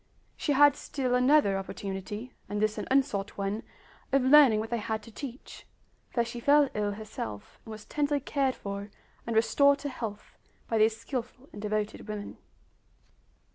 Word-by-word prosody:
She 290 - 0
had 290 0 +6
still 260 -4 -2
another 250 -6 +4
opportunity, 200 +5 -6 0.2
and 205 - -2
this 215 0 0
an - - -5
unsought 260 -7 +1
one, 200 +2 -2 0.5
of 275 -1 +3
learning 260 -5 +7
what 220 +2 -4
they 235 - 0
had 220 0 -3
to 230 - -12
teach, 260 +2 -9 0.4
for 235 -2 0
she 235 +1 -6
fell 285 +2 +5
ill 205 -1 -1
herself, 200 - -7
and - - -11
was 215 -1 -9
tenderly 290 -1 0
cared 275 -1 0
for 200 0 -6 0.4
and 230 - -2
restored 280 +5 +4
to 285 - -5
health 220 -5 -7 0.3
by 225 - +1
these 220 +1 +4
skillful 250 +3 -6
and 205 - -8
devoted 210 0 -2
women. 210 -1 -6
230 Hz, 165 wpm, -29 LUFS, 210-270 Hz, 0.5 s, learning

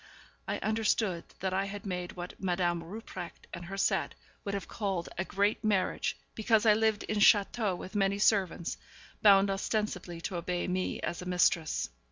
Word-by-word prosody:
I - - -1
understood 215 -4 0 0.2
that 190 0 -1
I 195 +1 +1
had 200 +1 -7
made 180 -2 -3
what 175 0 -7
Madame 175 -2 0
Rupprecht 180 -1 -8
and 170 0 -6
her 195 +3 -6
set 195 - +1 0.3
would 200 0 -2
have 200 - -4
called 195 -5 -2
a 190 - -1
great 200 +4 0
marriage, 200 -4 +1 0.2
because 220 0 +2
I 215 - +7
lived 220 -1 +1
in 215 - -1
château 205 -1 +4
with 185 - -8
many 200 -1 +2
servants, 195 -5 +1 0.4
bound 200 -1 +6
ostensibly 195 -3 -2
to 175 - -3
obey 175 +1 -2
me 185 0 -1
as 170 - -3
a 180 - -7
mistress. 180 - +2
195 Hz, 170 wpm, -31 LUFS, 180-210 Hz, 0.4 s, I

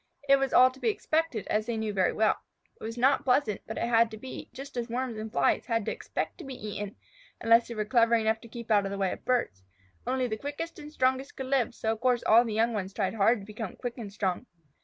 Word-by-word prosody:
It 275 0 +7
was 270 -1 0
all 255 +1 +7
to 260 - -16
be 455 - +1
expected, 325 - -1
as 215 +1 0
they 235 -2 -1
knew 220 -1 -2
very 185 -2 +2
well. 220 0 +2 0.4
It - - -13
was 225 +2 -5
not 260 +3 +3
pleasant, 250 -5 +2
but - - -5
it - - -1
had 230 -1 +4
to 220 - -8
be, 255 +4 -8
just 275 0 -9
as 240 -1 -3
Worms 245 0 -2
and 215 0 -6
Flies - - +1
had 230 -3 0
to - - -1
expect - - -4
to - - -7
be 270 -1 -7
eaten, 205 -2 -6 0.4
unless 230 +1 +5
they 235 - -6
were 215 -1 -1
clever 230 +1 +4
enough 220 0 +1
to 235 - -12
keep 235 0 -8
out 205 -2 +4
of - - -2
the 200 - -3
way 195 -2 0
of - - -7
birds. 235 - 0 0.4
Only 255 0 +1
the 220 -3 -2
quickest 290 +7 -5
and 300 0 -9
strongest 260 -1 0
could 265 - -4
live, 255 -3 +1
so 220 - -1
of 225 0 -4
course 250 -1 +2
all 230 +2 +6
the 230 - -4
young 230 +2 +2
ones 195 -2 -3
tried 195 -2 0
hard 220 +1 +3
to - - -10
become 215 -1 -6
quick 245 0 -5
and 210 -4 -6
strong. 195 +3 -2
230 Hz, 265 wpm, -29 LUFS, 215-255 Hz, 0.4 s, It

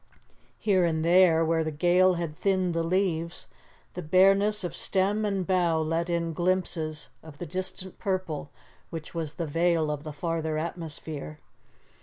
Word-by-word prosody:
Here 190 -4 +2
and 160 -1 0
there, 170 -2 +5
where 160 0 +1
the 155 - -2
gale 175 +4 +3
had 170 -3 -4
thinned 185 -1 +1
the 165 - 0
leaves, 170 -1 -1 0.5
the 180 - -5
bareness 195 +5 +4
of 175 - -4
stem 200 +3 +1
and 195 -3 -1
bough 175 -3 +2
let 165 +2 -1
in 170 -1 -1
glimpses 170 -3 -1
of 155 -3 -13
the 175 - -6
distant 185 +2 -4
purple 185 -8 -2 0.4
which 165 -2 -7
was 160 -2 -4
the 170 - -3
veil 165 0 +1
of 150 -1 -4
the 155 - -6
farther 160 +1 -2
atmosphere. 155 -2 -5
170 Hz, 155 wpm, -27 LUFS, 160-185 Hz, 0.5 s, there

